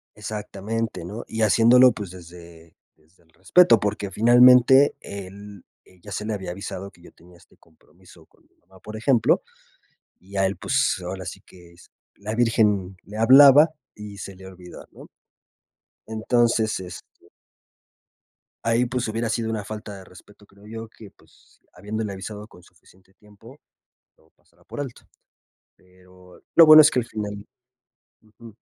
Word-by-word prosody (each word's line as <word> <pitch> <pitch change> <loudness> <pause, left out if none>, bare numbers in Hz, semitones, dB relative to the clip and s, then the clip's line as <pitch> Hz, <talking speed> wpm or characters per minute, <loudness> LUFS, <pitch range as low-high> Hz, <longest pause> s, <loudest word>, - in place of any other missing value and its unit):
Exactamente, 105 -1 -6
¿no?, 105 +6 -8
y 110 - -5
haciéndolo, 120 +4 +5
pues, 105 -5 -8
desde 85 -2 -15 0.2
desde 80 +3 -32
el 80 - -34
respeto, 115 - +3
porque, 100 -1 -4
finalmente, 125 +5 +5
él 100 0 -11 0.2
él 90 -1 -24
ya 105 - -13
se 105 +3 -5
le 110 - -3
había 95 -4 -6
avisado 100 +1 -8
que 85 - -24
yo - - -17
tenía 85 +1 -21
este - - -25
compromiso 85 +1 -23
con - - -32
mi - - -40
mamá, 95 -1 -23
por 110 +1 -9
ejemplo. 120 +1 +1 0.8
Y 100 +2 -10
a 95 - +2
él, 95 - -2
pues, - - -1
ahora - - -7
sí - - -9
que 85 -2 -19
es 85 - -21 0.2
la 105 +2 -7
virgen 105 -5 0
le 105 +2 -11
hablaba 140 +6 +7 0.2
y 105 -1 -11
se 100 - -9
le 95 0 -15
olvidó, 90 -1 -13
¿no? - - -16 1.0
Entonces, 110 0 0
este 90 -1 -10 1.6
ahí, 115 +2 +1
pues, 125 -1 -3
hubiera 115 +1 -3
sido 115 0 -3
una 110 -2 -4
falta 105 -1 -9
de 95 - -13
respeto, 100 +3 -19
creo 100 0 -22
yo 115 +1 -8
que, 110 -2 -16
pues, - - -28
habiéndole 105 +2 -6
avisado 105 +2 -9
con 90 -5 -19
suficiente 95 +2 -25
tiempo, 105 +7 -19 0.6
lo - - -31
pasara - - -32
por - - -9
alto. 135 -4 -8 0.7
Pero, 90 0 -21
lo 165 -1 +8
bueno 155 0 +10
es 150 - +4
que 125 - 0
al 120 - -6
final 105 -2 -7 0.8
ujú. 110 0 -17
105 Hz, 160 wpm, -22 LUFS, 95-115 Hz, 1.6 s, bueno